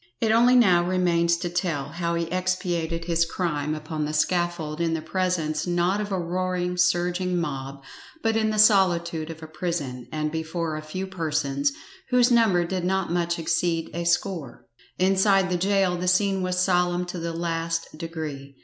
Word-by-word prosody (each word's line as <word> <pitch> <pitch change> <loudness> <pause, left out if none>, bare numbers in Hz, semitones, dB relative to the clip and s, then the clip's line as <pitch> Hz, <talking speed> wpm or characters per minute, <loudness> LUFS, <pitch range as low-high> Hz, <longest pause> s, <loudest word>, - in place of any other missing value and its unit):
It 225 - +1
now 220 - +5 0.4
only 180 +2 -1
remains 170 -1 +2
to 175 - -3
tell 170 -5 -2
how 170 +2 -2
he 170 - 0
expiated 175 -2 -1
his 170 -1 +2
crime 155 -3 -2
upon 155 0 -4
the 150 +1 -3
scaffold 170 -1 0
in 165 -1 +1
the 160 - -3
presence 180 -4 -1
not 175 +3 +1
of 205 -1 -5
a 190 - 0
roaring, 180 +1 -2
surging 180 0 +1
mob, 135 -3 -5 0.4
but 225 0 +1
in 220 -1 +2
the 215 - -1
solitude 175 -6 +3
of 160 0 -8
a - - -7
prison, 155 -6 -4
and 155 -1 -2
before 160 0 -3
a 155 - -4
few 170 +5 -5
persons, 165 - -1 0.4
whose 250 -1 +4
number 215 -7 +4
did 185 +1 -3
not 190 -1 0
much 170 0 0
exceed 165 0 -1
a 170 - -3
score. 170 -6 -1 0.3
Inside 190 0 +3
the - - +2
gaol 190 0 +1
the 180 +1 -3
scene 195 +1 +2
was 180 0 -1
solemn 180 -1 +2
to 180 0 -6
the 165 0 -3
last 165 -1 -3
degree. 155 -4 -6
175 Hz, 175 wpm, -25 LUFS, 160-185 Hz, 0.4 s, now